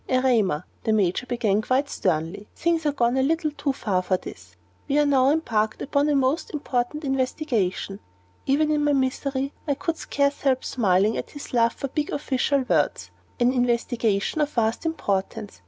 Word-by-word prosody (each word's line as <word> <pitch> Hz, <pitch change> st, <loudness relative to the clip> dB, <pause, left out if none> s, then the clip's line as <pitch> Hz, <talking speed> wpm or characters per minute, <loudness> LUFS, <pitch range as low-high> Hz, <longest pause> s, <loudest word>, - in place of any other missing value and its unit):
"Erema," 240 Hz, -, +2 dB, 0.2 s
the 220 Hz, -, +1 dB
Major 210 Hz, +2 st, +1 dB
began, 225 Hz, -4 st, +1 dB
quite 260 Hz, +5 st, +1 dB
sternly, 180 Hz, -, -2 dB
"things 335 Hz, -2 st, 0 dB
are -, -, +3 dB
gone 245 Hz, -2 st, +1 dB
a -, -, +3 dB
little 310 Hz, +2 st, +1 dB
too 290 Hz, -1 st, -1 dB
far 200 Hz, -8 st, -1 dB
for 185 Hz, 0 st, 0 dB
this. 90 Hz, -, -11 dB, 0.3 s
We 280 Hz, -, +1 dB
are 295 Hz, -, +4 dB
now 270 Hz, -2 st, +4 dB
embarked 220 Hz, -8 st, 0 dB
upon 285 Hz, +1 st, +1 dB
a 295 Hz, -, +2 dB
most 275 Hz, +4 st, +1 dB
important 275 Hz, +1 st, -2 dB
investigation" 255 Hz, -, -1 dB, 0.5 s
even 300 Hz, +3 st, +2 dB
in 300 Hz, -1 st, +1 dB
my 290 Hz, 0 st, +3 dB
misery 270 Hz, +1 st, -1 dB
I 285 Hz, -, +1 dB
could 330 Hz, +2 st, -2 dB
scarce 280 Hz, 0 st, 0 dB
help 260 Hz, -2 st, +1 dB
smiling 205 Hz, -2 st, +2 dB
at -, -, -5 dB
his 290 Hz, -2 st, -10 dB
love 235 Hz, +1 st, +1 dB
of 275 Hz, -, -3 dB
big 300 Hz, -1 st, -1 dB
official 280 Hz, 0 st, 0 dB
words -, -, 0 dB, 0.3 s
"an 245 Hz, +1 st, +3 dB
investigation 240 Hz, -1 st, 0 dB
of 295 Hz, -, +1 dB
vast 230 Hz, +3 st, 0 dB
importance. 205 Hz, -, -3 dB
260 Hz, 170 wpm, -24 LUFS, 220-285 Hz, 0.5 s, are